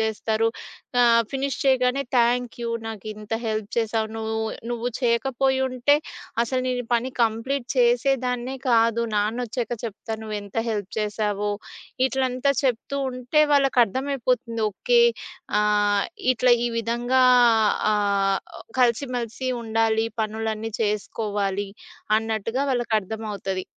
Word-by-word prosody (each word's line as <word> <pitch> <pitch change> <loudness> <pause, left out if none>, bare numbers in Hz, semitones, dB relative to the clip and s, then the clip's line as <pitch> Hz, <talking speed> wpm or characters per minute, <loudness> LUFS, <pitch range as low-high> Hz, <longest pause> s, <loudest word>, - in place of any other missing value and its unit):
జేస్తారు. 220 0 0 0.5
ఆహ్, 235 -1 +6
ఫినిష్ 275 0 -2
చేయగానే 260 0 +3
"థ్యాంక్ 240 0 +2
యూ! 235 - -2 0.2
నాకింత 215 0 -6
హెల్ప్ 215 -2 -2
చేసావు 225 -1 0
నువ్వు. 220 0 -2 0.3
నువ్వు 240 0 -2
చేయకపోయుంటే 265 +2 +2 0.5
అసలు 255 +2 -1
నేనీపని 245 0 -1
కంప్లీట్ 235 +4 -1
చేసేదాన్నే 250 +1 +1
కాదు. 230 0 +3
నాన్నొచ్చాక 235 +3 -1
చెప్తా 220 +1 -5
నువ్వేంత 210 -1 -6
హెల్ప్ 205 -3 -3
చేశావో" 210 -1 -1 0.6
ఇట్లంతా 265 +1 0
చెప్తూ 265 +2 -1
ఉంటే 255 +4 +1
వాళ్ళకర్థమైపోతుంది. 255 -2 +1
ఓకే. 480 - +2 0.6
ఆహ్, 205 -1 +2 0.3
ఇట్లా 245 +2 +4
ఈ - - 0
విధంగా 240 +3 +1 0.7
ఆహ్, 200 -2 +1 0.4
కలిసి 245 +2 +2
మెలిసి 240 +2 -3
ఉండాలి. 225 0 +1 0.2
పనులన్నీ 220 0 -3
చేసుకోవాలి 205 -1 -2 0.5
అన్నట్టుగా 225 +4 -2
వాళ్ళకర్థమవుతది. 215 -5 -2
230 Hz, 100 wpm, -24 LUFS, 215-250 Hz, 0.7 s, ఆహ్